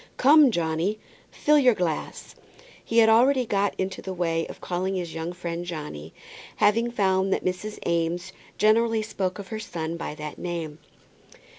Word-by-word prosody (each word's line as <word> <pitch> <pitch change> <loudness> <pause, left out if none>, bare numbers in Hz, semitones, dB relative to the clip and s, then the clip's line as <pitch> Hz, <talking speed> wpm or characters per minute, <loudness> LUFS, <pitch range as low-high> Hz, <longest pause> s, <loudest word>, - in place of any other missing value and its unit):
"Come, 290 +1 +7
Johnny, 170 +1 -1 0.3
fill 300 0 +3
your 250 -4 +5
glass." 170 -5 -3 0.5
He 230 - -2
had 225 -1 +7
already 250 +4 +4
got 200 -2 0
into 190 0 -3
the 190 -1 -6
way 165 -2 -1
of - - -10
calling 185 +2 -2
his 175 -3 -4
young 165 +1 -4
friend 175 -1 -5
Johnny, 150 - -7 0.4
having 230 +3 +3
found 195 -4 +1
that - - 0
Mrs. 185 +4 -3
Eames 170 +2 -1 0.2
generally 220 +1 +3
spoke 190 -4 -3
of 200 -2 -9
her 220 -1 -4
son 170 -6 -5
by 165 -2 -5
that 150 0 -7
name. 165 -3 -5
185 Hz, 160 wpm, -25 LUFS, 170-220 Hz, 0.5 s, Come